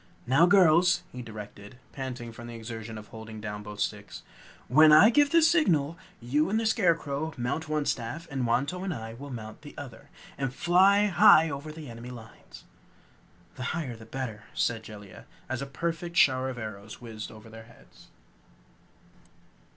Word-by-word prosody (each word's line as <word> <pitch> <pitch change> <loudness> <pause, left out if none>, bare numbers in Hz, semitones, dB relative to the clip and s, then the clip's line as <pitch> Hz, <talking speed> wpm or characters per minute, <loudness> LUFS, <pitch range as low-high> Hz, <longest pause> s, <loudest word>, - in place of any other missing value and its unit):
"Now 135 +8 +5
girls!" 175 -1 +5
he 125 - -7
directed, 105 0 -10
panting 125 -3 -6
from 120 +1 -10
the 120 - -8
exertion 115 -1 -7
of 105 0 -11
holding 110 -1 -9
down 105 -1 -6
both 105 0 -9
sticks. - - -4 0.4
"When 155 +5 +6
I 160 +9 +8
give 290 +3 +4
the 335 +2 +4
signal, 175 - +3 0.2
you 140 +6 0
and 220 +2 +1
the 225 - -2
Scarecrow 160 -7 0
mount 125 +6 -3
one 155 -1 0
staff, 135 +9 -3
and 130 -3 -1
Wantowin 145 +11 -1
and - - -3
I 115 0 -7
will 140 +5 -9
mount 110 -4 -8
the 145 - -13
other, 120 -5 -10 0.3
and 135 -2 -1
fly 195 +5 +4
high 190 -5 +6
over 140 +3 -6
the 155 -1 -9
enemy 115 +1 -9
lines!" 115 -2 -13 0.9
"The 130 - -5
higher 135 -8 -4
the 110 0 -13
better," 115 -4 -6
said 115 -2 0
Jellia, 105 -3 -12 0.2
as 130 0 -3
a 140 - -4
perfect 170 +4 -4
shower 130 -3 +4
of 130 - -6
arrows 110 -2 -8
whizzed 110 -3 -8
over 110 0 -13
their 115 0 -12
heads. 115 - -19
130 Hz, 170 wpm, -28 LUFS, 115-160 Hz, 0.9 s, I